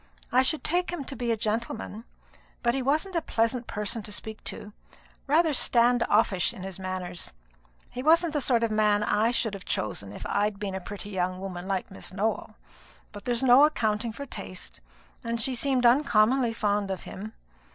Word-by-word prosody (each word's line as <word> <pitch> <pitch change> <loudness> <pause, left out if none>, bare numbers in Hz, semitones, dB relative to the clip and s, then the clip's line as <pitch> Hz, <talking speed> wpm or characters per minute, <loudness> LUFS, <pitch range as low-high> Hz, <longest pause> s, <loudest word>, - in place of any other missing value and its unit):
I 255 - +5
should 295 +4 0
take 355 +2 +1
him 345 -5 -4
to 275 - -6
be 240 -2 -1
a 225 - +1
gentleman; 220 +1 -3 0.6
but 235 -1 +3
he 270 - -1
wasn't 310 +8 0
a 335 - +2
pleasant 230 -2 0
person 210 +2 -2
to 210 - -5
speak 220 +1 -6
to 205 - -6 0.5
rather 315 +2 +4
stand 245 -1 +4
off 215 0 +4
ish 180 -3 0
in 185 - -8
his 190 -1 -6
manners. 185 -2 -4 0.6
He 250 - -5
wasn't 325 +3 +4
the 295 - 0
sort 240 -3 +2
of 230 - +1
man 210 -1 +3
I 215 +2 +2
should 230 -3 0
have 195 -2 -7
chosen 100 -2 -3
if - - -8
I'd 205 0 0
been 200 -1 -4
a 190 - -4
pretty 205 +2 -8
young 185 -1 -1
woman 185 -1 -6
like 195 -1 -2
Miss 195 - -4
Nowell; 210 +4 -2 0.6
but 205 +2 -10
there's 245 0 0
no 260 +2 +7
accounting 225 -6 +1
for 280 +6 -7
taste, 195 -7 -7 0.4
and 230 0 -2
she 255 +4 +2
seemed 255 0 +1
uncommonly 240 -1 +4
fond 205 -2 0
of 190 -2 -4
him. 215 +3 -8
225 Hz, 195 wpm, -27 LUFS, 200-255 Hz, 0.6 s, no